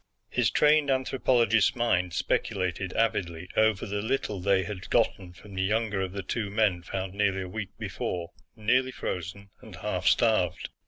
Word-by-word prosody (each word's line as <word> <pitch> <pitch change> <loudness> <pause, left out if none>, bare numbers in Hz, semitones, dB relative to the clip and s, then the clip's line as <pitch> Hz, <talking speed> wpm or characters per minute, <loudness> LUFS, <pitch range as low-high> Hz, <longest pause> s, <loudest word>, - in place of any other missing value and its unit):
His - - +2
trained 150 -1 +4
anthropologist's 130 -4 +2
mind 90 -8 +1
speculated 95 -1 -1
avidly 90 -6 -1
over 110 -3 +3
the 100 0 -3
little 110 -3 -1
they 95 +1 +2
had 95 -2 -7
gotten 90 -3 +1
from 95 +3 -14
the 95 - -2
younger 105 0 0
of 95 -1 -2
the 100 0 -5
two 105 +2 -2
men 100 -4 +1
found 95 +1 -4
nearly 100 -2 +1
a - - -6
week 100 +1 -5
before, 90 0 -4 0.2
nearly 125 +4 +2
frozen 95 -1 -5
and - - -11
half - - -3
starved. 110 -8 +2
100 Hz, 160 wpm, -28 LUFS, 95-110 Hz, 0.2 s, trained